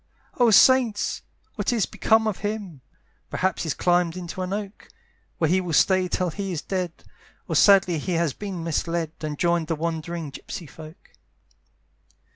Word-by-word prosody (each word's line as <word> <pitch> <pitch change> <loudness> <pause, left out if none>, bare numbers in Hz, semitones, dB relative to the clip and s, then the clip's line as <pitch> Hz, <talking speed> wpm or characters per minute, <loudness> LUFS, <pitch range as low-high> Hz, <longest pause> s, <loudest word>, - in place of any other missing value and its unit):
"Oh 240 -1 +5
saints! 235 -1 +4 0.3
what - - -1
is 230 -5 +1
become 220 0 +2
of 215 -4 -2
him? 205 -8 -5 0.5
"Perhaps 190 -1 -1
he's 160 -4 -2
climbed 175 -1 +1
into 180 +1 -6
an 185 0 -3
oak, 200 0 -5 0.5
"Where 160 - +2
he 185 +4 +2
will 175 -3 -4
stay 185 +3 +3
till 180 0 -1
he 195 +3 -4
is 165 -4 -4
dead; 180 -3 -4 0.4
"Or - - -2
sadly 190 -5 +5
he 180 +5 -3
has 165 -4 +1
been 195 -5 -6
misled, 165 0 -2
"And 150 -2 -4
joined 170 -1 +1
the 165 - -1
wandering 165 -1 -4
gypsey 165 - -8
folk. 155 +4 -13
180 Hz, 160 wpm, -24 LUFS, 165-195 Hz, 0.5 s, Oh